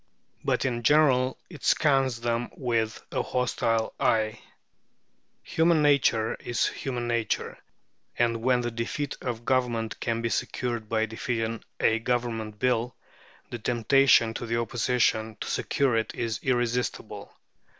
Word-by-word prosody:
But - - 0
in 120 -3 -1
general 130 -1 +4
it 155 -7 -12
scans 135 -5 +2
them 120 0 -1
with 115 -3 -1
a - - 0
hostile 115 -3 0
eye. 110 -1 +1 1.0
Human 160 -1 +2
nature 130 -6 +3
is 120 - 0
human 120 -3 -3
nature; 115 -2 -1 0.6
and 115 -1 +1
when 125 0 +2
the 120 0 -2
defeat 115 +5 -3
of 120 -2 -4
Government 120 -4 0
can 115 -1 -2
be 115 - 0
secured 120 -2 -2
by 110 -1 +1
defeating 115 0 -3 0.2
a 115 0 +3
Government 115 -3 -2
Bill, 125 +1 0 0.6
the 120 - -5
temptation 120 0 +4
to 120 - -5
the 115 +1 0
Opposition 115 -1 0
to - - -5
secure 135 -4 +1
it 110 0 -1
is 115 -3 -2
irresistible. 120 -1 -2
120 Hz, 130 wpm, -27 LUFS, 115-125 Hz, 1.0 s, general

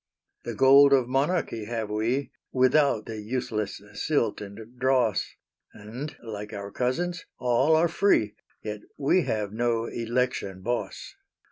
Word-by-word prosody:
The - - -4
gold 140 +1 +7
of 130 -3 +4
monarchy 135 -4 0
have 110 -1 -3
we, 115 +6 -1 0.2
Without 130 -3 +3
the 110 -2 -6
useless 110 -2 -3
silt 115 -2 0
and 110 +4 -10
dross; 125 -6 +1 0.4
And 120 +8 -8
like 105 -2 -7
our 100 0 -6
cousins, 170 - -2
all 125 +5 +3
are 165 +2 +4
free, 160 - +2 0.3
Yet 105 -1 -5 0.2
we 150 +5 +2
have 105 -2 -2
no 115 0 0
election 115 -5 -2
boss. 105 -4 -3
120 Hz, 130 wpm, -26 LUFS, 105-135 Hz, 0.4 s, gold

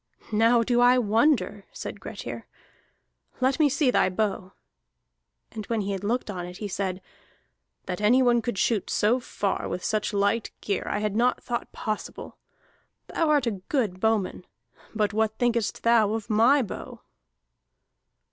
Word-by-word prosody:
"Now 230 +2 +4
do 240 0 +2
I 245 +1 +6
wonder," 240 +5 +1
said - - -7
Grettir. - - -7 0.9
"Let 260 +2 +1
me 300 -2 +5
see 280 -1 +2
thy 185 - +3
bow." 190 -1 -2 1.0
And 215 -2 -7
when 230 -2 0
he 200 0 -3
had 195 0 -4
looked 225 +1 -1
on 175 -2 -5
it 180 0 -9
he 210 - -4
said: 190 -1 -3 0.8
"That 180 +1 -4
any 245 +5 +4
one 240 -1 +3
could 230 -2 -3
shoot 215 0 0
so 225 +5 +2
far 205 -5 -3
with 180 - -4
such 215 0 -1
light 205 +2 +1
gear 200 - -2
I 205 - -1
had 210 -1 -1
not 245 +3 +1
thought 240 -1 -4
possible. 215 -1 -5 0.8
Thou 325 -2 +1
art 295 -3 +3
a 230 - +1 0.2
good 215 -10 0
bowman. 210 -4 0 0.5
But 210 -1 +1
what 220 0 0
thinkest 235 -3 0
thou 225 -3 +4
of 225 0 -5
my 245 +6 +5
bow?" 215 - -8
220 Hz, 155 wpm, -26 LUFS, 205-245 Hz, 1.0 s, I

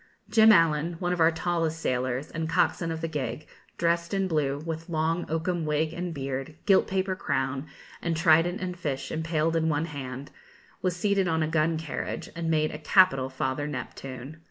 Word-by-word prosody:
Jim 220 -1 +7
Allen, 165 -3 +4
one 175 0 -1
of 180 - -3
our 160 0 +6
tallest 165 -1 -1
sailors, 130 0 -1
and 160 -1 -3
coxswain 165 +1 +1
of 160 0 -4
the 165 - -1
gig, 145 -2 -4 0.3
dressed 170 +2 +1
in 195 -1 +1
blue, 145 -5 0
with 165 +1 -5
long 165 +1 0
oakum 165 +2 -1
wig 155 +1 0
and 175 0 -3
beard, 135 +1 -4
gilt 195 -2 +5
paper 190 0 0
crown, 135 -3 -2 0.3
and 170 -2 -1
trident 165 +2 +4
and 180 -1 -4
fish 140 -6 -3
impaled 160 0 0
in 160 0 +2
one 150 +1 +1
hand, 140 -3 -7 0.5
was 180 -2 0
seated 195 0 +1
on 160 -1 +1
a - - 0
gun 160 +1 +1
carriage, 160 -1 -5
and 165 -1 -2
made 155 -1 +2
a 150 - -7
capital 150 -5 +4
Father 130 +2 -2
Neptune. 130 +1 -7
160 Hz, 180 wpm, -27 LUFS, 145-170 Hz, 0.5 s, Jim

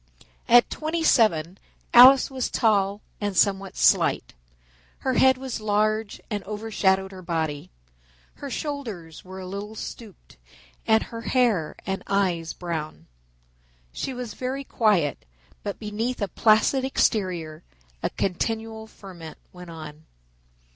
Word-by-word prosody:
At 240 0 +6
twenty 320 +1 -2
seven 190 - +3 0.3
Alice 255 +3 +8
was 260 -2 -2
tall 205 -3 +1 0.2
and 205 -3 -2
somewhat 195 -1 +1
slight. - - +3 0.7
Her 260 - 0
head 260 +1 +5
was 260 -3 -5
large 215 0 0
and 205 -3 -4
overshadowed 200 -2 0
her 190 -1 -10
body. 160 -4 -3 0.7
Her 285 - -7
shoulders 230 - -5
were 190 +1 -9
a 185 - -7
little 200 +3 -6
stooped 215 -3 -10 0.5
and 220 0 +4
her 230 -1 -8
hair 230 - +1
and 190 0 -3
eyes 180 -5 0
brown. 160 -3 -5 0.9
She - - -4
was 245 -3 -6
very 260 +2 -4
quiet 205 - +1 0.4
but 205 -1 -5
beneath 225 +4 -3
a 200 - -1
placid 220 +7 +3
exterior 180 -11 0 0.4
a - - 0
continual 220 +3 -3
ferment 180 -7 -11 0.2
went 180 -1 -11
on. 155 -1 -10
205 Hz, 125 wpm, -25 LUFS, 180-235 Hz, 0.9 s, Alice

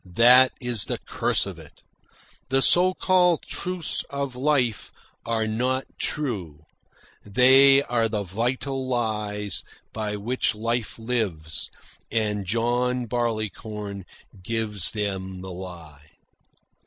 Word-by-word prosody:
That 125 +2 +7
is 120 -4 +1
the - - -2
curse - - +1
of - - -8
it. - - -16 0.7
The 135 0 +3
so 185 +1 +6
called 180 -3 +3
truths 180 -3 -3
of 140 -2 -4
life 130 -5 0 0.4
are 115 -1 0
not 125 +4 -1
true. 95 - -2 0.6
They 135 +6 +6
are 115 -3 0
the 105 -2 -2
vital 130 +7 -2
lies 105 -5 -2 0.3
by 105 -1 -3
which 110 +2 -1
life 115 +1 -2
lives, 105 -10 -3 0.4
and 105 -3 -1
John 120 +3 0
Barleycorn 110 -4 -4 0.4
gives 105 -2 0
them 95 -3 -4
the 95 0 -7
lie." 85 -5 -10
115 Hz, 110 wpm, -24 LUFS, 105-125 Hz, 0.7 s, That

